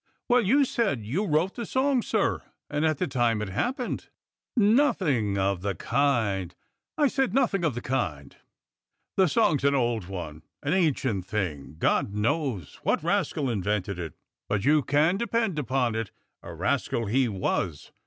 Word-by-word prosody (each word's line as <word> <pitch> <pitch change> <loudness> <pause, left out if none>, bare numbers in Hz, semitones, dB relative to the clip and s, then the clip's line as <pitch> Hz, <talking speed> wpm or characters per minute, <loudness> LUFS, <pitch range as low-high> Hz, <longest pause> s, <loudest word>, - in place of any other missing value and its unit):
"Well, 245 0 +4
you 270 +7 +4
said 195 - -1
you 180 - -1
wrote 160 +5 +1
the 235 - -5
song, 265 -1 +2
sir, 215 -2 0 0.3
and 150 +1 0
at 155 -2 +2
the 180 - 0
time 120 -6 +1
it 105 -2 -3
happened." 245 - -2 0.5
"Nothing 195 - +3
of 95 -1 0
the 100 0 -2
kind 105 - 0 0.2
— - - -62
I 295 -2 +4
said 265 -3 0
nothing 225 -9 +2
of 155 -8 +1
the 120 - -5
kind. 85 - -2 0.8
The 190 -1 +4
song's 145 -1 +2
an 140 0 +3
old 120 -7 0
one, 80 -5 -6 0.2
an 145 +2 0
ancient 130 - +1
thing. 85 -9 -3
God 100 +4 +1
knows 115 - -1
what - - 0
rascal 140 - 0
invented 100 -3 -1
it, 80 -3 -6 0.3
but 100 0 0
you 150 +2 +5
can 150 +7 +2
depend 230 -6 0
upon 130 -3 0
it, 110 -2 -3 0.3
a - - -9
rascal 115 - -1
he 125 +5 +2
was. 90 -5 -2
130 Hz, 165 wpm, -27 LUFS, -, 0.8 s, you